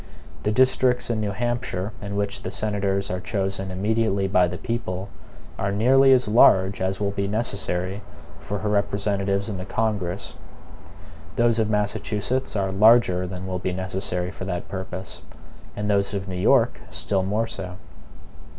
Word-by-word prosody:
The 105 - 0
districts 125 +1 +3
in 110 -2 -1
New 105 - -1
Hampshire 115 -2 -2
in 100 0 -5
which 100 0 -2
the - - -4
senators 100 -2 -1
are 90 - -2
chosen 95 0 -2
immediately 100 +1 0
by 90 -2 +4
the 90 +1 -5
people, 100 -3 -3 0.5
are 100 +1 0
nearly 130 +6 +5
as 125 -3 +4
large 100 -3 +5
as 95 +1 -1
will 100 -1 0
be 100 0 -2
necessary 100 -3 -2 0.4
for 100 - -4
her 105 +1 -2
representatives 100 0 0
in 105 -3 -4
the 90 - -5
Congress. 100 -4 -2 1.0
Those 120 -1 +3
of 110 -1 +1
Massachusetts 105 +4 -1
are 95 -2 0
larger 95 -3 +5
than 90 0 -6
will 90 -1 -3
be 90 0 -2
necessary 95 -1 -3
for 95 - -7
that 90 -2 -4
purpose; 95 0 -6 0.5
and 105 0 -3
those 100 0 +1
of 100 0 -3
New 95 - -5
York 90 - +3
still 95 -2 0
more 105 +4 0
so. 95 -5 -7
100 Hz, 160 wpm, -24 LUFS, 95-110 Hz, 1.0 s, nearly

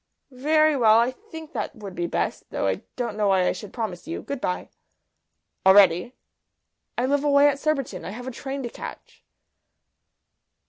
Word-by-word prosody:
"Very 310 +4 +3
well. 225 -4 +5
I 235 +2 +3
think 320 -1 -11
that - - -4
would 205 -4 -8
be 175 -1 -2
best, - - -2
though - - -2
I 95 -1 0
don't 235 -4 -3
know 210 -1 +1
why 190 -2 +3
I - - +3
should 210 - -8
promise 215 - -5
you. 335 - -5
Good 280 -2 -5
bye." 180 - -2 0.9
"Already?" 190 +2 +5 0.8
"I 245 - +1
live 285 +2 +1
away 285 0 +5
at 280 -1 +1
Surbiton. 275 - -1
I - - -5
have 240 +5 -7
a 260 - -4
train 270 +2 -5
to 240 - -3
catch." - - -10
245 Hz, 175 wpm, -24 LUFS, 200-280 Hz, 0.9 s, well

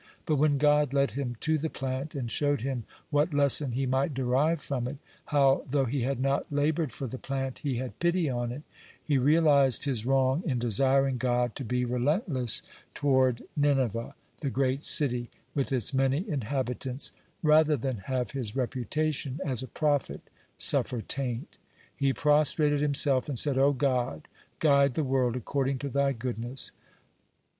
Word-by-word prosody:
But 155 - +1
when 145 0 +3
God 150 -1 +3
led 140 -4 +2
him 125 -1 -4
to 160 -1 +1
the 160 +2 -2
plant, 135 +4 -4
and 120 -4 -4
showed 145 -4 0
him 125 -3 -3 0.3
what 145 +1 +1
lesson 140 -2 +4
he 135 +2 -1
might 135 +3 0
derive 135 +6 +1
from 130 -4 -3
it, 135 +3 -6 0.3
how, 140 -2 +3
though 135 0 +1
he 130 +2 -2
had 130 +1 -1
not 135 +2 -1
labored 150 0 0
for 135 - -5
the 130 +1 -6
plant, 135 -1 -4
he 140 -4 -2
had 130 0 -6
pity 175 -1 +1
on 120 -2 -2
it, 140 +5 -8 0.4
he 145 -3 +1
realized 140 -2 +4
his 130 -6 -1
wrong 135 +3 +2
in 135 -7 -1
desiring 130 +3 +2
God 120 -1 0
to - - -5
be 125 +1 -1
relentless 130 - 0 0.3
toward 130 -4 +2
Nineveh, 130 -6 0 0.2
the 140 - -2
great 135 +1 0
city, 125 -6 +2 0.2
with 140 -2 -1
its 130 +1 -1
many 135 - +1
inhabitants, 130 - -3 0.3
rather 155 -1 +4
than 130 -1 -3
have 130 -2 -2
his 125 -7 -4
reputation 135 +2 -2
as 130 -3 -1
a 130 - -6
prophet 145 +2 -1 0.4
suffer 120 -3 +3
taint. 130 0 -3 0.4
He 140 -2 +1
prostrated 150 +1 +2
himself 140 -1 +3
and 135 - -3
said: 135 +1 +3
"O 140 +1 +4
God, 125 - -1 0.3
guide 140 -4 +3
the 155 - 0
world 130 -3 0
according 135 +2 -1
to 140 +2 -5
Thy 140 +1 +1
goodness." 120 +1 -2
135 Hz, 165 wpm, -28 LUFS, 125-145 Hz, 0.4 s, lesson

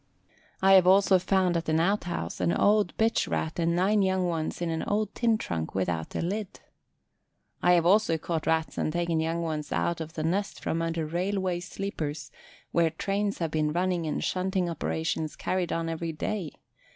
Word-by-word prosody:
I 195 0 +7
have 185 -2 +7
also 190 0 +5
found 185 -1 +1
at 165 -1 -3
an 160 0 +2
out 195 +5 +1
house 175 - -4
an - - +2
old 205 -1 +2
bitch 225 +1 +1
Rat 160 +2 -2
and 170 0 +1
nine 200 +4 +3
young 190 -1 +1
ones 165 -3 -2
in 170 -1 -1
an 160 - -2
old 210 0 -1
tin 230 -2 +2
trunk 80 - -4
without 90 -4 -2
a - - -1
lid. 195 +3 -3 1.0
I 180 - +5
have 170 -1 +3
also 185 -3 +4
caught 160 0 -3
Rats 160 0 0
and - - 0
taken 170 -1 0
young 165 +1 -1
ones 155 -2 -3
out 170 -1 0
of 160 0 -6
the 155 - -3
nest 190 +5 -1
from 165 - -2
under 165 -1 -1
railway 180 +2 -1
sleepers 160 -5 -5 0.4
where 170 -1 +3
trains 200 +5 -2
have 165 -3 -2
been 150 -1 0
running 175 -1 0
and 150 - -2
shunting 185 0 0
operations 160 -1 -2
carried 185 -2 -1
on 165 0 -1
every 165 0 -3
day. 170 0 -3
170 Hz, 190 wpm, -28 LUFS, 160-190 Hz, 1.0 s, I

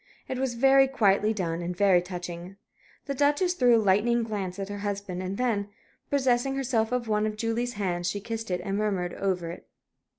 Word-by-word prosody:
It 255 - -3
was 260 -2 -1
very 270 +2 +5
quietly 210 -5 +2
done, 175 -5 -2
and 175 +1 -4
very 190 -3 +5
touching. 180 0 -7 0.5
The 280 - -2
Duchess 290 +6 +2
threw 250 -8 +4
a 220 -2 +2
lightning 230 +5 +3
glance 200 -4 -4
at 195 -1 -4
her 205 0 -5
husband; 200 -3 -4
and 185 +1 -4
then, 220 -5 0 0.4
possessing 265 -1 +1
herself 240 -4 0
of 250 -2 -1
one 215 0 +1
of 215 0 -4
Julie's 230 +2 -1
hands, 175 -4 -1
she 205 - -3
kissed 225 +1 -5
it 180 -1 -1
and 195 -1 -2
murmured 195 -4 -1
over 180 -4 -2
it. 175 - -11
210 Hz, 195 wpm, -27 LUFS, 185-240 Hz, 0.5 s, very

